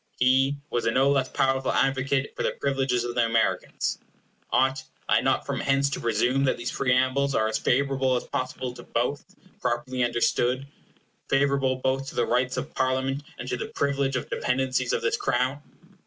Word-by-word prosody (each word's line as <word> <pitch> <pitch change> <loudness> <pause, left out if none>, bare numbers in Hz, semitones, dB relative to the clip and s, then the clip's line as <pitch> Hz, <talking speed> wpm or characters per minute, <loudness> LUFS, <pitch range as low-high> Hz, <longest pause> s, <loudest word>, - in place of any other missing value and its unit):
He 135 +2 +3
was 120 -1 0
a - - +3
no 135 +4 +3
less 135 -2 +1
powerful 135 0 +1
advocate 135 +1 +1
for - - -4
the - - 0
privileges 135 -3 0
of 120 0 -3
the 120 - +2
Americans. 115 -1 0 0.5
Ought 130 0 +2 0.2
I - - +4
not - - +1
from - - -2
hence 140 0 +1
to - - -2
presume 120 +4 +1
that 130 - +1
these 120 - -3
preambles 130 +1 +1
are 110 - +2
as 110 - -1
favorable 135 0 +1
as 120 - -1
possible 130 -1 -4
to 120 - -10
both, 120 +5 -2
when - - -27
properly 130 -3 -1
understood; 120 +2 +1 0.6
favorable 135 -1 +2
both 130 +1 -1
to - - -11
the 120 - +2
rights 125 +2 0
of 130 +4 -4
Parliament, 130 +1 0 0.2
and 125 - -7
to 125 - -2
the - - -4
privilege 140 -1 -1
of 125 - -2
the - - -3
dependencies 130 -1 0
of - - -1
this 115 - +1
Crown? 130 +2 0
130 Hz, 185 wpm, -26 LUFS, 125-135 Hz, 0.6 s, I